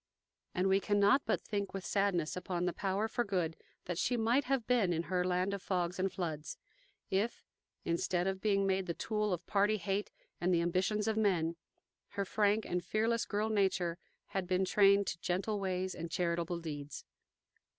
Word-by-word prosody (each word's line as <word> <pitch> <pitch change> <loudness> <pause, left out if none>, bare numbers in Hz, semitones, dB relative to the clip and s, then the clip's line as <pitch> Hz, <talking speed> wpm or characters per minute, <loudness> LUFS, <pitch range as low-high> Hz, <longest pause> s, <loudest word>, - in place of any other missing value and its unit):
And 185 +1 +2
we 190 0 +4
cannot 205 +5 +4
but - - +1
think 200 -2 -3
with 195 - -5
sadness 195 -6 +1
upon 180 -1 -2
the 180 - 0
power 195 +2 -1
for 240 +2 0
good 180 -6 -1 0.3
that 175 -1 -3
she 245 - +1
might 235 +5 +2
have 260 -3 0
been 225 -8 +3
in 165 0 -1
her 180 -1 +2
land 185 +2 0
of 200 - -3
fogs 180 -2 -1
and 190 0 +1
floods 160 -4 -4 0.5
if, 200 +5 0 0.4
instead 175 +1 0
of 190 0 -2
being 200 -2 +2
made 190 -1 +1
the 170 - -2
tool 210 -2 -1
of 175 -2 -2
party 205 +2 +2
hate 195 +2 -2 0.3
and 180 +1 +2
the 170 -2 +3
ambitions 190 +5 0
of 220 -1 +1
men, 175 -6 +2 0.6
her 200 - +1
frank 210 +2 +2
and 180 0 -2
fearless 230 +2 +1
girl 210 +1 -1
nature 190 -5 +1 0.3
had 195 -3 -2
been 185 +1 +2
trained 200 +1 +5
to 175 - -3
gentle 195 +5 -1
ways 185 -1 -1
and 170 0 -6
charitable 170 0 -1
deeds. 145 -3 -6
190 Hz, 180 wpm, -33 LUFS, 175-205 Hz, 0.6 s, trained